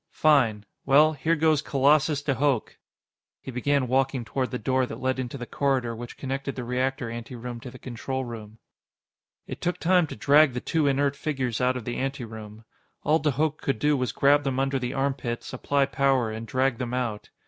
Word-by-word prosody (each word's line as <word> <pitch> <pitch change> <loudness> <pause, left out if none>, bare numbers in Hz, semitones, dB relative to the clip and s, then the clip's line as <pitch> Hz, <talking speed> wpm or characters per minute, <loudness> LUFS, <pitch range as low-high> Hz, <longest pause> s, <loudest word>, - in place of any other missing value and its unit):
"Fine. 120 -9 +3 0.2
Well, 150 +3 +5
here 160 +3 +1
goes 155 -2 +3
Colossus 145 +1 +2
de 145 - +1
Hooch." 135 -3 0 0.6
He 130 - -8
began 130 +2 +1
walking 130 -1 +1
toward 130 +1 -2
the 125 - -3
door 130 0 0
that - - -7
led 130 0 -1
into 130 +1 -4
the 120 - -6
corridor 130 -4 0
which 120 +1 -8
connected 135 0 -4
the 125 - -4
reactor 125 +1 -1
anteroom 120 +1 -7
to 125 - -9
the 125 - -11
control 130 +2 -4
room. 110 -2 -9 0.9
It - - -8
took 175 - -1
time 180 -1 +3
to - - -7
drag 145 +4 +5
the 125 - -2
two 155 +3 0
inert 140 0 +1
figures 130 -6 -2
out 125 0 +2
of 120 - -7
the 120 - -3
anteroom. 110 -5 -6 0.4
All 155 +2 +3
de 155 - +1
Hooch 150 +3 0
could 135 - -2
do 150 +5 +2
was 125 -2 -1
grab 145 +1 +4
them 135 -2 -1
under 135 0 0
the 125 -1 -3
armpits, 135 -4 -2
apply 140 +2 +1
power, 135 -4 +1
and 110 +1 -6
drag 130 +1 0
them 125 -1 -3
out. 120 -5 -3
130 Hz, 195 wpm, -26 LUFS, 120-140 Hz, 0.9 s, Well